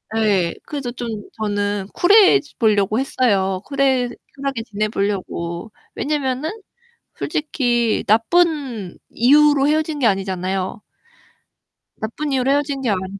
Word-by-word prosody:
예. 200 -6 +1
그래서 275 -5 -4
좀 240 0 -6 0.3
저는 205 -2 -2
쿨해 405 +2 +6 0.2
보려고 215 -1 +2
했어요. 200 -8 +1
쿨해 265 -3 +1 0.3
쿨하게 275 -4 -3
지내보려고. 200 -3 -3 0.2
왜냐면은 285 0 -1 0.7
솔직히 245 -7 0
나쁜 245 - +1
이유로 290 +3 +4
헤어진 310 0 0
게 260 - +1
아니잖아요. 190 -1 -2 1.2
나쁜 255 +7 -4
이유로 260 -1 +1
헤어진 285 -1 0
게 250 - -1
아니니까 190 0 -3
235 Hz, 270 characters per minute, -20 LUFS, 200-280 Hz, 1.2 s, 쿨해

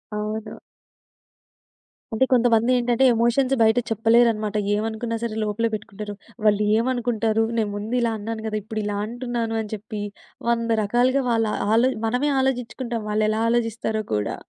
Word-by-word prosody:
అవును. 215 +1 -4 1.5
అంటే 225 +4 +3
కొంతమందేంటంటే, 240 0 +3
ఎమోషన్స్ 240 +3 +2
బయట 220 +1 +4
చెప్పలేరన్నమాట. 225 -1 +2 0.2
ఏమనుకున్నా 225 +2 -2
సరే 230 -2 -3
లోపలేపెట్టుకుంటారు. 210 -1 -3 0.3
వాళ్ళు 210 0 +4
ఏమనుకుంటారు, 230 -2 +1
నేను 220 -2 +1
ముందు 210 +4 -3
ఇలా 235 -1 +1
అన్నాను 220 +1 -5
గదా! 215 -1 -2
ఇప్పుడిలా 210 -1 -3
అంటున్నాను 235 -1 -3
అని 215 - -8
చెప్పి 210 0 -7 0.5
వంద 230 -1 +1
రకాలుగా 250 +6 +2
వాళ్ళ 225 -1 +2 0.3
ఆలో 235 +4 +4 0.2
మనమే 250 +6 +1
ఆలోచించుకుంటాం 245 -2 -2
వాళ్ళు 215 0 +1
ఎలా 215 +1 0
ఆలోచిస్తారో 225 -2 0
కూడా. 105 -1 -1
225 Hz, 125 wpm, -23 LUFS, 215-240 Hz, 1.5 s, బయట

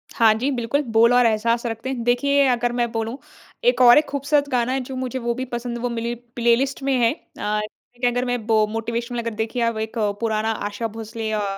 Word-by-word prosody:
हाँ, 225 -2 +5
जी। 250 +6 -1
बिल्कुल 245 +3 0
बोल 235 +2 +6
और 245 0 +5
एहसास 230 +2 +1
रखते 225 +3 -4
हैं। 245 -3 -3
देखिए 280 +4 +3
अगर 240 -1 +1
मैं 240 -1 0
बोलूँ 225 +2 -3 0.5
एक - - +3
और 240 -1 +8
एक 300 - +4
खूबसूरत 285 +1 0
गाना 250 0 +1
है 270 - 0
जो 260 +1 -7
मुझे 255 0 -3
वो 235 -1 -1
भी 260 +1 -3
पसंद 240 0 -4
वो 245 +1 -2
मेरी 235 0 -3 0.2
प्लेलिस्ट 245 +4 +1
में 275 0 +1
है। 230 0 +4
अ, 210 -8 -4
लेकिन 245 +3 -4
अगर 245 +1 -1
मैं 245 -3 -2
बो 220 -2 +4
मोटिवेशनल 235 +2 -3
अगर 230 -1 -3
देखिए 225 +3 -2
आप 230 -1 0
एक 220 +2 -4 0.2
पुराना 220 0 0 0.2
आशा 215 +3 -3
भोसले 225 0 -6
अ 200 -2 -2
235 Hz, 220 wpm, -22 LUFS, 225-250 Hz, 0.5 s, और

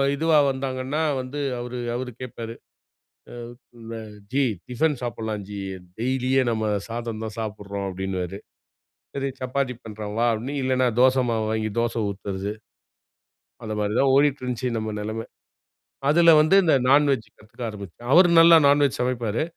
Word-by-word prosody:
இதுவா 160 +1 +3
வந்தாங்கன்னா 130 +2 -3 0.2
வந்து 130 +3 -6 0.2
அவரு 125 +1 -5 0.2
அவரு 125 0 -4
கேட்பாரு 115 -2 -6 1.5
அ - - -6 0.3
"ஜி 140 +2 +2 0.3
டிஃபன் 145 +4 +1
சாப்படலாம் 110 -3 -4
ஜி 100 -1 -6 0.4
டெய்லியே, 130 +2 +1
நம்ம 110 -1 -1 0.2
சாதம் 115 -1 -5
தான் 110 - -6
சாப்படுறோம்" 100 -2 -5
அப்டின்னுவாரு. 95 0 -4 0.8
"சரி 140 0 -2
சப்பாத்தி 130 0 -1
பண்றேன் 105 -1 -7
வா" 120 - +3
அப்டின்னு 125 +6 -4
இல்லன்னா 130 -1 +2
தோசை 130 0 +4
மாவு 110 -1 0
வாங்கி 110 0 -1
தோசை 115 0 0
ஊத்துறது. 100 0 -4 1.1
அத 110 - -5
மாரி 105 0 -1
தான் 135 -1 +4
ஓடிட்டிருந்துச்சு 130 -3 +1
நம்ம 110 -1 -3
நெலமை. 110 +2 -4 0.8
அதுல 170 +2 +6
வந்து 155 +5 +4
இந்த 160 -4 +3 0.2
நான் 145 +2 +5
வெஜ் 115 -6 -1
கத்துக்க 115 +3 -11
ஆரம்பிச்சேன். 105 +3 -9
அவரு 175 +2 +7
நல்லா 165 0 +8
நான் 145 +1 +4
வெஜ் 135 - -2
சமைப்பாரு. 120 -1 -1
120 Hz, 140 wpm, -24 LUFS, 110-135 Hz, 1.5 s, நல்லா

